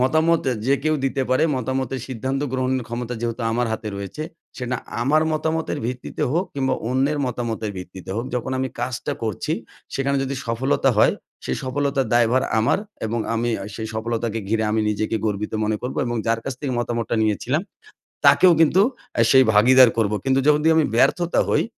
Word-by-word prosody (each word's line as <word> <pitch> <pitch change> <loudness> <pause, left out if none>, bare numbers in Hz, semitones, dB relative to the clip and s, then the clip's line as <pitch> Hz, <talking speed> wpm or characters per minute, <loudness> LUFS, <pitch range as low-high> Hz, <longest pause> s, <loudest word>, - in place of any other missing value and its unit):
মতামত 160 +5 +3 0.2
যে 140 - +4
কেউ 155 0 +2
দিতে 135 0 0
পারে 130 +4 +3
মতামতের 130 +1 -2
সিদ্ধান্ত 130 +2 -2
গ্রহণের 130 -1 0
ক্ষমতা 120 +1 -4
যেহেতু 115 0 -3
আমার 120 +1 +1
হাতে 110 -1 -4
রয়েছে, 100 +10 -6 0.3
সেটা 125 0 -2 0.3
আমার 150 +5 +3
মতামতের 160 +1 -1
ভিত্তিতে 125 0 -4
হোক, 175 +4 +1
কিংবা 130 -2 0 0.2
অন্যের 135 +4 +1
মতামতের 115 -3 -3
ভিত্তিতে 90 0 -9
হোক 115 - -2
যখন 125 +1 -2
আমি 130 - -1
কাজটা 125 0 -2
করছি, 110 -4 -2 0.4
সেখানে 140 +1 0
যদি 135 +1 -3
সফলতা 130 +3 +1
হয়, - - +5 0.3
সেই 65 - -2
সফলতার 140 0 0
দায়ভার 120 +2 +3 0.2
আমার। 110 - +2 0.3
এবং 115 +2 -2 0.2
আমি 120 +1 0 0.2
সেই 110 -1 -5
সফলতাকে 115 0 -2
ঘিরে 110 0 +1
আমি 110 - +1
নিজেকে 110 +2 -1
গর্বিত 105 0 -2
মনে 105 0 0
করব। 125 - -4
এবং 120 - -2
যার 115 0 +1
কাছ 135 - -3
থেকে 135 -3 -2
মতামতটা 120 -1 -1
নিয়েছিলাম 125 - 0 0.7
তাকেও 185 -1 +6
কিন্তু 170 +5 +5 0.4
আ - - +4
সেই 130 -1 +7
ভাগীদার 125 +4 +7
করব। 105 -2 +2
কিন্তু 135 0 +3
যখন 150 0 +5 0.2
আমি 160 -2 +4
ব্যর্থতা 175 +7 +3
হই, - - +3
125 Hz, 170 wpm, -22 LUFS, 115-135 Hz, 0.7 s, সেই